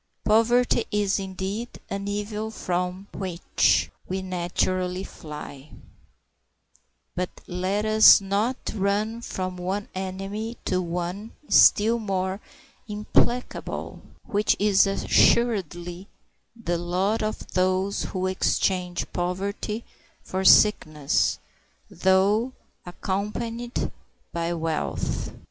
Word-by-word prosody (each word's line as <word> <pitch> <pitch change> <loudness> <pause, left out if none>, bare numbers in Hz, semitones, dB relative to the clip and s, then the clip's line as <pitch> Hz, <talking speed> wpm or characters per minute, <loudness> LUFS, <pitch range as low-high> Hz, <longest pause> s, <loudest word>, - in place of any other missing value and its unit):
Poverty 235 +2 +3
is, 205 -1 +1
indeed, 195 +4 -5
an 200 0 -4
evil 210 +1 -3
from 180 -1 -3
which 185 -3 +1 0.2
we 190 +1 -2
naturally 185 0 -1
fly; 150 -3 -9 1.4
but 180 0 -1 0.2
let 185 +4 -1
us 215 0 +8
not 205 +6 0 0.2
run 210 +3 0
from 185 -5 -4
one 190 +3 -3
enemy 195 +4 -4
to 185 -1 +1
one 180 +5 -4 0.2
still 225 +3 +6
more 190 -1 -2 0.5
implacable, 225 +3 -1 0.2
which 205 +1 +2
is 200 -1 +4
assuredly 190 -4 +1 0.5
the 175 -7 -2
lot 185 +5 0
of 215 0 -4
those 185 +2 +1
who 185 -1 -3
exchange 185 -1 0
poverty 200 +5 -3 0.4
for 190 0 -3
sickness, 155 -10 +4 0.5
though 200 +6 +2 0.3
accompanied 225 +6 -3 0.4
by 170 0 -1
wealth. 165 -2 -2
195 Hz, 90 wpm, -25 LUFS, 180-210 Hz, 1.4 s, us